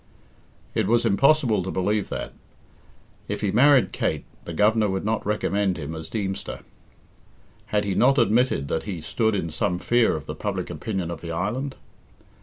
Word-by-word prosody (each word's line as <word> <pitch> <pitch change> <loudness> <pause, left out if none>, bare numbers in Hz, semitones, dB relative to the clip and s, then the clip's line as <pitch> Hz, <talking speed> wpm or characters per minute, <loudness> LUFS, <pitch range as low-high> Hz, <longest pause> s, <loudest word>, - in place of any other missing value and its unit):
It - - 0
was 120 +2 +3
impossible 120 0 +3
to 95 - -4
believe 100 +2 0
that. - - -5 0.9
If - - -3
he 100 - 0
married 130 +4 +5
Kate, - - -2 0.2
the - - -5
Governor 105 +4 +3
would 95 +1 -2
not 110 +1 0
recommend 100 -2 0
him 75 +2 -5
as 80 0 -7
Deemster. 95 -3 -4 1.1
Had 105 -1 +1
he 100 -1 -1
not 135 +8 +4
admitted 115 - +2
that 80 - -1
he 90 -4 -3
stood 110 +7 0
in 85 -4 -2
some 90 +3 -1
fear 120 +3 +2
of 75 - -6
the - - -5
public - - -3
opinion 95 -6 -3
of - - -6
the 85 - -5
island? 120 +11 -2
105 Hz, 170 wpm, -24 LUFS, 90-115 Hz, 1.1 s, married